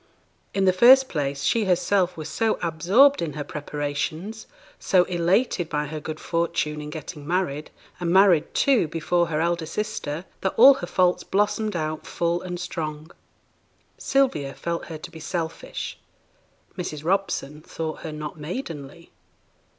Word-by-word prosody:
In 195 -1 +2
the 185 - +5
first 260 +7 +7
place, 140 -2 -2
she 225 +8 +2
herself 180 0 +1
was 155 - -5
so 225 -1 0
absorbed 185 - +4
in 160 -4 -2
her 145 +1 -4
preparations, 150 +8 -4 0.3
so 185 -2 +4
elated 175 +1 +1
by 150 0 -1
her 155 +1 -5
good 155 +1 -6
fortune 160 -3 -1
in 150 - -7
getting 150 -1 -8
married, 165 -4 -1 0.3
and 175 -1 -1
married, 185 -4 +5
too, 260 - +3
before 170 +2 0
her 155 -2 -1
elder 170 -1 0
sister, 190 -6 -4 0.2
that 190 - -1
all 265 +4 +10
her 175 -9 -6
faults 180 0 +2
blossomed 210 +1 0
out 155 -1 -3
full 170 0 -1
and 180 -1 -5
strong. 155 -3 -5 0.9
Sylvia 155 - +1
felt 170 0 -3
her 160 - -7
to 155 - -10
be 165 - -10
selfish; 165 - -5 0.8
Mrs. 155 -5 -5
Robson 170 -5 -1
thought 160 0 -5
her 160 - -6
not 150 +1 -7
maidenly. 165 - -7
170 Hz, 150 wpm, -24 LUFS, 155-190 Hz, 0.9 s, all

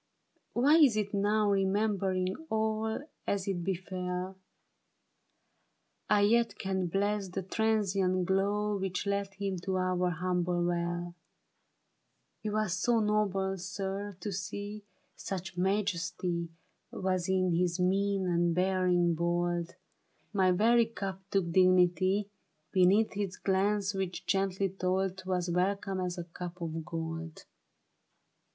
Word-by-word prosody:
Why 285 +6 +5
is 275 -9 +6
it 205 -1 -1
now. 205 +1 +2
Remembering 195 -1 +1
all 220 +1 0 0.3
as 200 -1 -1
it 180 -3 -1
befell, 185 0 -3 1.7
I 210 -1 +4
yet 230 +3 +3
can 190 -1 -1
bless 200 +2 0
the 190 +1 -4
transient 195 -3 +1
glow 205 +2 +1
Which 190 -1 -2
led 200 0 -1
him 195 -1 -2
to 190 +2 -2
our 180 -1 +1
humble 175 0 0
well? 175 0 -2 1.3
He 215 - -3
was 215 -3 0
so 230 +6 +2
noble, 195 -3 0
sir, 195 +1 -4
to 205 - -3
see; 205 +3 -5 0.3
Such 190 -1 -5
majesty 180 -3 -1 0.4
Was 185 -1 -1
in 185 -2 +2
his 175 +1 +1
mien 195 +1 +1
and 170 -1 +1
bearing 180 -2 +2
bold: 175 0 -1 0.6
My 190 -2 +3
very 225 +5 +4
cup 195 -4 -5
took 190 -4 0
dignity 185 +2 +4 0.4
Beneath 195 +4 +4
his 195 -2 -3
glance 200 +1 +1
which 190 -2 -3
gently 195 0 +1
told 190 0 -1
'Twas 185 -2 -2
welcome 195 +2 0
as 180 -1 -2
a 175 - -3
cup 175 +1 -8
of 165 -1 -4
gold. 165 -1 -5
190 Hz, 120 wpm, -31 LUFS, 180-200 Hz, 1.7 s, is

